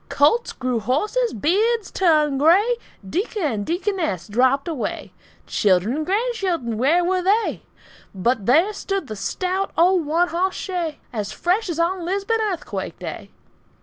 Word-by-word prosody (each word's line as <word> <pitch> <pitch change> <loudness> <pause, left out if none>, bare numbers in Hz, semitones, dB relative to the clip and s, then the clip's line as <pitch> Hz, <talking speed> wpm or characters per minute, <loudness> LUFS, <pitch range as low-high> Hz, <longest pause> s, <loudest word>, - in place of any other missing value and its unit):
Colts 305 +12 +3
grew 255 -2 -2
horses, 415 - 0
beards 410 - +1
turned 305 -6 +2
gray, 395 - +4 0.3
Deacon 395 - -2
and 225 -9 -1
deaconess 340 - -1
dropped 260 +7 +2
away, 310 -7 -4 0.3
Children 200 +4 +2
and 310 - -2
grandchildren 375 - -1
where 330 +8 +3
were 370 +1 +1
they? 405 +5 +1 0.5
But 210 +2 0
there 330 - +4
stood 390 -3 -3
the 220 - -6
stout 370 - -2
old 345 -1 +3
one 340 +3 +2
hoss 370 +3 0
shay 345 -5 -3 0.2
As 210 -3 -3
fresh 375 +4 0
as 330 - -3
on 350 +2 0
Lisbon 395 +5 -1
earthquake 405 -5 -3
day! - - -7
345 Hz, 145 wpm, -22 LUFS, 265-390 Hz, 0.5 s, gray